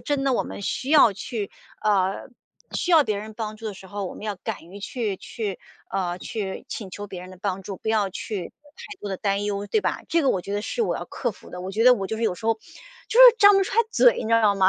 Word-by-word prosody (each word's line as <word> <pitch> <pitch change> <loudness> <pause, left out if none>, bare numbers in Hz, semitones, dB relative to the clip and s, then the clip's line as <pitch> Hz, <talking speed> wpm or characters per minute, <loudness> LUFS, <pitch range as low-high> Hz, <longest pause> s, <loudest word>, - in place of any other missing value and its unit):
真 285 -2 -1
的 270 - +2
我 - - +2
们 - - -8
需 255 +7 -2
要 285 -9 +7
去， 205 +1 -5 0.3
呃， 195 0 +1 0.5
需 360 - -1
要 320 -4 +7
别 215 -2 -1
人 215 +1 -8
帮 215 -1 -5
助 225 0 -7
的 205 - -4
时 190 - -12
候， 200 +1 -5
我 - - -7
们 - - -11
要 210 - -2
敢 - - -4
于 190 +5 -11
去 210 -2 -3
去， 205 -3 -5 0.3
啊， 180 -2 -2
去 195 -1 -5
请 195 -4 -6
求 205 +3 -7
别 185 -2 -8
人 185 +1 -10
的 185 - -13
帮 195 -1 -2
助， 190 0 -6
不 220 - -6
要 210 -3 +2
去 190 -1 -5 0.3
太 415 -2 -10
多 205 - -5
的 190 - -3
担 200 0 0
忧， 205 0 -2
对 435 - +2
吧？ - - -1
这 335 0 +2
个 275 - +2
我 185 - 0
觉 200 - -6
得 205 - 0
是 470 - -1
我 - - 0
要 - - -5
克 240 - -3
服 205 - -15
的。 180 - -7
我 185 +1 -5
觉 220 +4 +1
得 250 0 +9
我 195 -5 -4
就 220 - -2
是 230 - -4
有 210 -5 +1
时 220 - -12
候， 225 - +4
就 220 - -27 0.6
是 - - +10
张 410 -1 +8
不 390 - +4
开 390 +3 -2
嘴， - - +6
你 - - -6
知 - - 0
道 215 -3 +4
吗？ 190 -1 +5
210 Hz, 300 characters per minute, -24 LUFS, 195-235 Hz, 0.6 s, 是